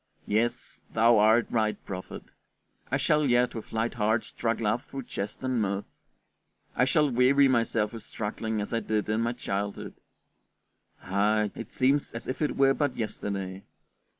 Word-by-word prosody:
Yes, 115 +3 -1
thou 115 0 +5
art 110 +3 +5
right, 110 -2 +1
prophet: 95 -1 -7 0.7
I - - +1
shall 150 0 +2
yet 125 -2 +3
with 115 - -8
light 115 +1 -1
heart 110 0 +1
struggle 115 -1 -2
up 110 +4 +1
through 135 -1 -5
jest 105 +1 -6
and 130 -3 0
mirth; 100 -1 -1 0.9
I 125 - +4
shall 150 +2 +3
weary 130 +3 +5
myself 115 -4 +1
with 115 - -7
struggling 110 +1 -3
as 105 - -5
I 115 - +2
did 110 -2 -1
in 110 +1 +1
my 120 +1 0
childhood 100 -4 -4 1.1
(ah, 105 +3 +1
it 115 - -8
seems 135 +3 +1
as 115 - -6
if 130 - -4
it 150 - 0
were 135 0 +5
but 145 -3 -1
yesterday!) 100 -4 -4
115 Hz, 160 wpm, -28 LUFS, 105-125 Hz, 1.1 s, thou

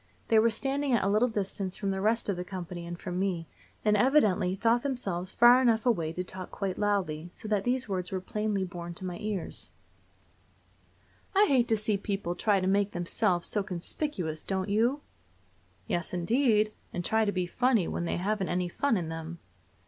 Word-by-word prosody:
They 225 - +6
were 230 +2 +4
standing 275 +4 -1
at 230 - +3
a - - +1
little 215 +5 +3
distance 200 -3 -1
from 200 -2 -1
the 190 0 -2
rest 225 +3 +1
of 200 - 0
the 180 - -4
company 180 -2 -6
and 175 0 -5
from 180 0 -4
me, 185 -4 -1 0.4
and 210 0 +4
evidently 210 -6 +3
thought 230 +4 +2
themselves 195 -10 -2
far 240 +4 +7
enough 230 -3 +2
away 170 -10 +1
to 180 - -3
talk 185 0 -5
quite 195 -2 -3
loud, 205 -5 +1 0.2
so - - -6
that 210 -2 0
these 250 0 0
words 185 -3 -3
were 190 - -1
plainly 210 +1 -2
borne 175 -1 -6
to 185 - -4
my 180 -1 -5
ears: 210 -5 -4 1.7
"I 405 +2 +7
hate 255 - +3
to 225 - +3
see 210 -1 0
people 195 -3 -3
try 200 +2 +2
to 185 - -2
make 200 +1 +2
themselves 175 +1 0
so 210 - 0
conspicuous, 180 - -4
don't 190 0 -2
you?" 235 +8 +2 0.8
"Yes, 180 -3 -2
indeed; 215 +3 +2 0.2
and 175 - -4
to - - +2
try 220 0 +3
to 205 - +1
be 185 -2 -1
funny 230 0 +2
when 170 - -2
they - - -1
haven't 195 +1 -1
any 180 0 0
fun 235 +4 +1
in 170 -3 -3
them." 165 +1 -6
200 Hz, 195 wpm, -29 LUFS, 180-225 Hz, 1.7 s, far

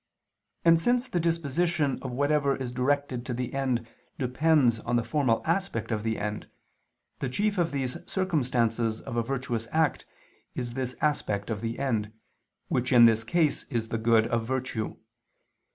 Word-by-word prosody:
And 165 -1 +6
since 245 +7 +1
the 210 -9 -1
disposition 165 -2 0
of 130 - -4
whatever 140 +1 +2
is 130 -2 -4
directed 130 0 0
to 125 - -2
the 125 0 -4
end 130 -4 0 0.3
depends 130 -2 +3
on 120 +2 -2
the 120 - +2
formal 130 -5 +1
aspect 165 - -1
of 110 -2 0
the 110 0 -1
end, 105 0 -4 0.7
the 135 - -2
chief 205 +8 0
of 170 -1 +1
these 135 -3 -2
circumstances 120 - 0
of 115 - -7
a 120 - +2
virtuous 120 -2 -2
act 160 -1 +1 0.5
is 120 -2 -3
this 125 0 -3
aspect 105 -8 0
of 105 -2 -3
the 115 0 -3
end, 110 -6 -1 0.6
which 125 +1 0
in 120 -2 +8
this 115 -1 +4
case 155 +4 +1
is 115 -4 -3
the 115 - -2
good 110 0 +4
of 115 -1 0
virtue. 125 -2 -3
125 Hz, 165 wpm, -28 LUFS, 115-150 Hz, 0.7 s, in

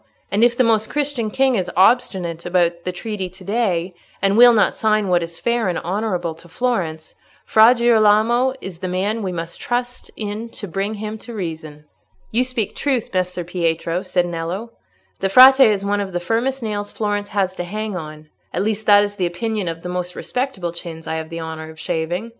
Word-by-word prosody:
And 205 +4 +2
if 240 0 +4
the 255 - +4
Most 220 -2 +2
Christian 285 -6 -1
King 265 +4 +2
is 190 -6 -1
obstinate 185 -6 +2
about 175 -1 0
the 180 - -1
treaty 190 0 -5
to 185 +1 -14
day, 190 -4 -1 0.3
and 195 +1 +2
will 240 +2 +9
not 220 -3 +3
sign 215 -2 +1
what 175 -1 +3
is 170 0 -6
fair 235 -2 0
and 175 - -1
honourable 180 -2 -2
to 165 +2 -17
Florence, 170 -9 -2 0.3
Fra 220 +3 +6
Girolamo 235 +2 +3
is 180 -3 -8
the 185 - -3
man 200 +5 -1
we 190 -3 -2
must 170 -1 -6
trust 245 +1 -3
in 215 +2 -4
to 205 - -6
bring 195 +4 -2
him 215 +1 -6
to 235 +1 -9
reason." 155 -5 -6 0.5
"You 240 +3 +2
speak 250 -4 -3
truth, 260 -8 -1
Messer 180 -1 -1
Pietro," 170 0 -1
said 185 -2 0
Nello; 175 +6 -4 0.5
"the 195 - 0
Frate 260 +6 +9
is 210 -6 +5
one 205 0 0
of 195 -2 -5
the 175 - 0
firmest 235 +8 -1
nails 205 -2 -3
Florence 205 -1 -2
has 190 -2 -1
to - - -2
hang 210 +3 -4
on—at 155 +2 -7
least, 215 0 -2
that 205 -1 +7
is 205 0 -4
the 180 -3 +1
opinion 205 +2 -3
of 165 0 -5
the - - -5
most 180 0 -4
respectable 250 -10 -3
chins 165 -1 -8
I 160 - -2
have 160 0 -6
the 165 -1 -5
honour 160 -1 -6
of 160 0 -13
shaving. 175 +6 -2
200 Hz, 200 wpm, -20 LUFS, 175-225 Hz, 0.5 s, will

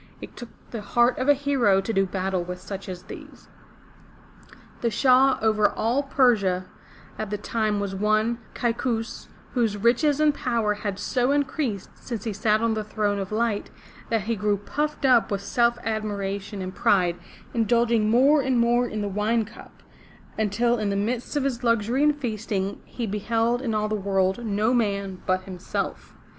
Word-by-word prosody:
It - - -10
took 240 -1 -9 0.2
the 230 - -4
heart 240 +4 +2
of 260 +2 0
a 290 - +7
hero 265 -9 +2
to 195 +4 -2
do 195 -1 +2
battle 185 -1 -1
with 180 +1 -6
such 195 +1 -7
as 180 -1 -7
these. - - -12 1.3
The 235 - +1
Shah 260 +3 +4
over 215 -1 +3
all 235 +5 0
Persia 230 - +2 0.5
at 215 - -3
that 210 0 -4
time 215 -3 0
was 200 -1 -3
one, 215 +4 +1 0.2
Kai' 235 -1 +1
kous, 230 -2 -3 0.3
whose 225 -5 +1
riches 250 +7 +2
and 305 -1 +4
power 235 -7 0
had 205 -1 -4
so 245 +5 0
increased 270 -7 -1
since 230 -5 -5
he 220 - -3
sat 215 +1 +1
on 230 -1 +2
the 215 -1 -2
throne 210 -1 -1
of 195 0 -5
Light, 220 -1 -1 0.4
that 225 -2 +1
he 230 +3 -1
grew 205 0 0
puffed 295 +8 -3
up 250 -3 +5
with 200 -1 -2
self 235 +2 +2
admiration 200 -2 -3
and 185 0 -5
pride, 180 -4 +2 0.4
indulging 230 -1 +2
more 275 +6 +5
and 260 -1 +1
more 240 +1 +3
in 215 -2 -4
the - - -1
wine 210 +3 0
cup, 210 - -15 0.5
until 225 +3 +1
in 210 -1 -1
the 200 - -1
midst 230 +7 -2
of 285 - +1
his 255 -3 -2
luxury 230 +2 +1
and 300 0 +4
feasting, 215 -6 -3
he 240 - -5
beheld 225 +3 0
in 230 -5 -2
all 215 0 0
the 215 - -3
world 195 +1 0
no 215 +2 +1
man 200 -5 -1
but 185 0 +1
himself! 185 -1 -5
220 Hz, 175 wpm, -25 LUFS, 200-240 Hz, 1.3 s, a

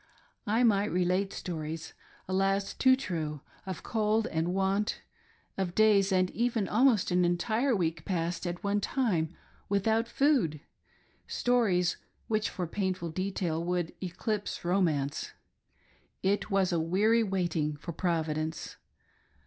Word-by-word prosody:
I 225 +4 +3
might 210 -3 +3
relate 185 +2 +1
stories 160 -2 -5 0.2
— - - -28
alas, 195 +1 +1
too 260 -1 +5
true 160 - -4
— - - -28
of 185 - -5
cold 220 0 +1
and 165 -4 -1
want; 195 +2 0 0.6
of 180 -2 -2
days, 210 -2 +4
and 185 -1 +2
even 235 -4 0
almost 230 -4 +3
an 180 0 +3
entire 220 +9 +1
week 165 -4 -1
passed 175 0 -2
at 175 0 -5
one 205 0 +1
time 180 - 0 0.3
without 220 +3 +2
food 240 - +2 0.4
— - - -35 0.2
stories 205 -8 +2 0.3
which 215 -1 0
for 180 - -3
painful 185 -2 -2
detail 180 -2 -2
would 175 -1 -1
eclipse 195 +2 -3
romance. 160 -6 0 0.9
It 200 +3 +1
was 195 -2 +2
a 170 - +1
weary 205 +8 +3
waiting 170 -7 -1
for 170 - -6
Provi 165 -2 0
dence 155 +1 -4
190 Hz, 135 wpm, -30 LUFS, 170-210 Hz, 0.9 s, too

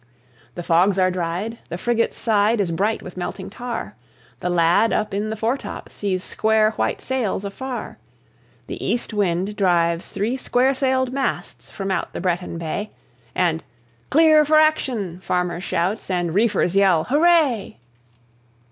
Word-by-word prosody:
The 175 - -5
fogs 180 +4 +3
are 185 -1 +3
dried, 180 +6 -3
the 175 - -4
frigate's 230 +3 0
side 215 0 +2
is 190 -4 0
bright 205 +6 0
with 185 - -10
melting 185 +2 -5
tar, 240 +3 -5 0.5
The 180 - -2
lad 175 +6 +3
up 215 -1 -1
in 205 +2 -1
the 220 - -3
foretop 230 +5 -3
sees 185 -3 -2
square 220 0 +2
white 220 - -2
sails 240 -6 -2
afar; 250 +5 -6 0.7
The - - -7
east 235 -1 -1
wind 195 0 0
drives 170 -3 +1
three 215 +6 -2
square 255 +1 +2
sailed 260 -1 0
masts 275 0 -3
from 195 -1 -4
out - - -2
the - - -4
Breton 180 -2 -2
bay, 170 +6 -4 0.5
And 165 -3 +1 0.5
"Clear 310 0 +6
for 310 +1 +3
action!" 245 - +1
Farmer 180 -2 -1
shouts, 190 +4 -2
and 175 -3 -1
reefers 205 -3 +2
yell 190 -5 +4
"Hooray!" 295 - +2
205 Hz, 145 wpm, -22 LUFS, 180-240 Hz, 0.7 s, Clear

